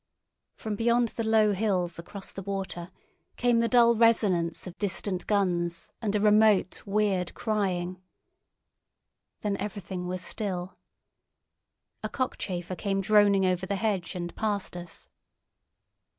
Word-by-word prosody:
From 215 -1 -4
beyond 235 +2 +2
the 230 - -4
low 220 -1 +4
hills 185 -4 0
across 190 +3 -8
the 195 - -7
water 190 -3 -4 0.5
came 240 -1 +2
the 230 - +2
dull 235 -1 +5
resonance 205 -7 +2
of 180 -1 -8
distant 190 -1 -2
guns 175 -4 0
and 210 -2 -1
a - - +3
remote 210 -2 +4
weird 200 -3 0
crying. 185 -4 -1 1.4
Then 205 -2 -1
everything 190 -3 -5
was 185 0 -3
still. 185 -2 -3 1.3
A - - -3
cockchafer 185 -8 -3
came 195 +1 -1
droning 200 -1 +4
over 185 0 0
the 200 - -1
hedge 195 -4 -1
and 175 -1 -5
past 205 -4 -2
us. 175 -2 -8
200 Hz, 125 wpm, -28 LUFS, 180-215 Hz, 1.4 s, dull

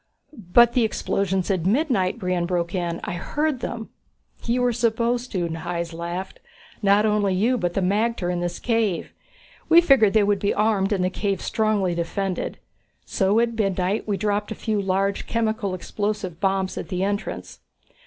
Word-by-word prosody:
"But 235 +3 +4
the 245 - +3
explosions 195 -3 0
at 185 -2 0
midnight?" 230 - +1
Brion 180 -4 -1
broke 170 -1 -1
in. 175 -2 -2
"I - - -3
heard 295 - -1
them!" 230 -2 -5 0.6
"You 245 +1 +1
were 245 -1 +2
supposed 235 +1 0
to," 175 -3 0
Hys 170 +1 -4
laughed. 170 +3 -5 0.4
"Not 205 +1 +4
only 210 -3 +2
you, 230 +7 +2
but 175 -7 -2
the 195 - +1
magter 200 -1 0
in 175 - -2
this 175 0 -3
cave. 225 -6 -1 0.6
We 330 +1 +8
figured 270 - +5
they 215 -2 +5
would 200 -1 +2
be 200 - 0
armed 210 -2 +1
and 190 -3 +1
the 185 - 0
cave 195 -1 -1
strongly 210 -5 0
defended. 180 +2 -3 0.5
So 195 +3 +2
at 235 0 +1
midnight 195 -2 -1
we 205 -2 0
dropped 205 +1 -1
a - - -3
few 215 -3 -1
large 195 +1 0
chemical 220 -4 -1
explosive 205 -2 -3
bombs 190 0 0
at - - -6
the 185 0 -1
entrance. 200 +1 -3
200 Hz, 170 wpm, -23 LUFS, 185-220 Hz, 0.6 s, We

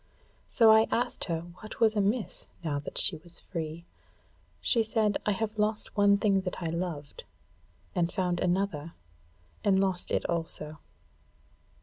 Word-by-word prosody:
So 225 -3 +6
I 220 0 +6
asked 240 - 0
her 165 -3 -2 0.2
what 215 - -9
was 220 -1 +4
amiss 210 +3 -1 0.2
now 145 -3 -1
that 140 - -7
she 180 - +3
was 170 +2 -8
free. 165 -1 -5 0.7
She 235 - +3
said: 220 -2 +1
'I 210 - +3
have 215 +2 -3
lost 210 0 -1
one 200 -1 +5
thing 200 -2 +2
that 180 -1 -4
I 165 -3 -2
loved, 165 -4 -4 0.7
and 175 -1 +1
found 180 -2 0
another 175 -4 -1 0.7
and 195 -2 +4
lost 190 -2 0
it - - 0
also.' 160 -2 -3
190 Hz, 145 wpm, -29 LUFS, 170-215 Hz, 0.7 s, So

